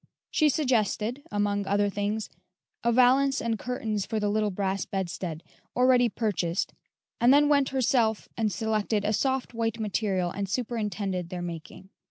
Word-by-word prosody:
She 305 -2 +4
suggested, 245 -3 0
among 205 -1 0
other 205 +1 +2
things, 205 +1 -2 0.5
a 235 - +3
valance 260 +3 +4
and 225 -2 -1
curtains 220 -4 -2
for 220 +1 -2
the 210 -1 0
little 210 0 +1
brass 195 0 -1
bedstead, 175 -3 -4 0.3
already 250 -1 +4
purchased, 195 -6 -1 0.5
and 240 +2 +5
then 290 +1 +6
went 280 -2 +3
herself 240 -4 +1
and 220 -2 0
selected 215 +1 0
a 215 - +1
soft, 265 +3 0
white 230 -1 -1
material 195 -4 0
and 200 -1 -4
superintended 205 -6 -2
their 180 -1 -5
making. 170 +2 -8
215 Hz, 150 wpm, -27 LUFS, 200-245 Hz, 0.5 s, then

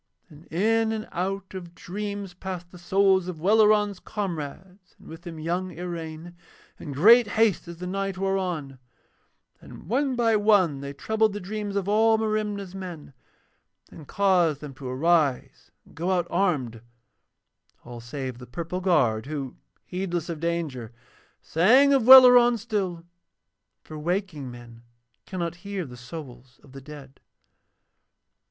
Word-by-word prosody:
And 150 +2 -17
in 220 +6 +1
and 220 -1 -4
out 190 +2 -4
of 175 -2 -9
dreams 200 0 -6
passed 180 -1 -7
the 180 - -13
souls 190 +1 +2
of 175 -4 -6
Welleran's 210 +1 +3
comrades, 185 0 -7
and - - -18
with 165 +1 -10
them 170 -2 -9
young 175 +4 -2
Iraine, 170 -1 -7 0.4
in 150 - -7
great 220 - +6
haste 215 -4 +1
as 170 -1 -9
the 180 - -7
night 195 +1 -3
wore 195 0 0
on; 155 -8 -4 0.8
and - - -12
one 260 +5 0
by 230 -2 +2
one 200 -9 +3
they 140 0 -6
troubled 220 +8 0
the 205 - -4
dreams 205 +1 -5
of 200 -1 -1
all 220 +2 +4
Merimna's 210 -3 -2
men 180 -7 -8 0.8
and 150 - -13
caused 180 -7 +2
them 145 -2 -9
to 130 0 -9
arise 145 0 0 0.2
and - - -20
go 170 +3 -3
out 180 -2 +1
armed, 145 - 0 1.0
all 120 0 -9
save 130 0 -6
the 125 - -11
purple 170 +6 -5
guard 135 -11 +1
who, 140 -4 -5 0.3
heedless 175 -2 -4
of 165 -2 -4
danger, 160 -9 -3 0.5
sang 255 - +4
of 260 -4 +2
Welleran 245 -2 +9
still, 195 -7 -3 0.8
for 155 -1 -9
waking 175 -4 -3
men 120 -1 -12 0.5
cannot 175 -2 -4
hear 195 0 -5
the 125 -3 -11
souls 125 -1 -11
of 140 - -18
the 135 +1 -10
dead. 140 -1 -12
180 Hz, 145 wpm, -25 LUFS, 150-200 Hz, 1.0 s, Welleran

